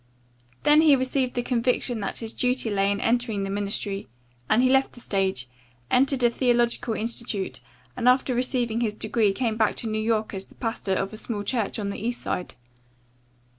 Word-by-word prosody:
Then 295 +1 +6
he 305 -3 +6
received 260 -1 0
the 245 - 0
conviction 245 -1 0
that 200 - -3
his 225 -1 -5
duty 250 -2 0
lay 195 -1 +2
in 200 - -1
entering 230 -4 0
the 195 - -3
ministry 200 0 -3 0.4
and 235 +3 +4
he - - +5
left 270 +1 +3
the - - -13
stage, 190 - -1 0.4
entered 265 0 +3
a 240 - +6
theological 240 -1 +1
institute 225 -3 -3 0.3
and 250 0 +3
after 255 0 +3
receiving 245 -2 0
his 215 -3 -1
degree 215 -1 +1
came 225 +1 -1
back 220 -2 +2
to 230 - -2
New 215 0 -1
York 220 -1 0
as 195 0 -4
the - - -20
pastor 225 -5 -2
of 195 +2 -2
a - - -7
small 215 -2 -4
church 225 -1 -1
on 200 -2 -2
the - - -6
East 240 +1 -1
Side. 180 - -3
230 Hz, 190 wpm, -25 LUFS, 205-250 Hz, 0.4 s, Then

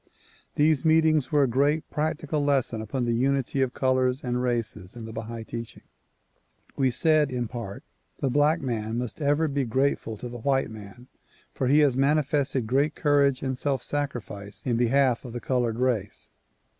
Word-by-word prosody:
These 150 -2 +3
meetings 160 -2 +3
were 145 -2 +4
a - - +3
great 145 +6 +1
practical 155 -1 -1
lesson 135 -5 +1
upon 120 +4 -2
the 120 - 0
unity 135 +2 0
of 130 -2 0
colors 130 0 +1
and 125 -1 -1
races 115 -5 -2
in 115 -2 -7
the 110 - -7
Bahai 115 0 -6
teaching. 115 0 -7 0.9
We 135 -2 +2
said 150 +3 +2
in 125 -2 -2
part: 110 -4 -7 0.3
The 135 - -1
black 150 +4 +3
man 115 -3 -2
must 125 +5 -4
ever 145 +2 +2
be 140 -1 -1
grateful 130 -2 0
to 125 - -6
the 120 0 -8
white 135 -1 0
man 110 +3 -11 0.5
for 130 - -1
he 145 +4 +5
has 140 -4 +3
manifested 140 -2 +1
great 140 +6 +1
courage 140 -2 +2
and 130 -1 -1
self 135 -1 -1
sacrifice 120 -8 -4
in 125 -3 +1
behalf 125 +1 +2
of 125 -3 -8
the 120 - -4
colored 120 -3 -1
race. 120 -5 -2
130 Hz, 170 wpm, -26 LUFS, 120-145 Hz, 0.9 s, he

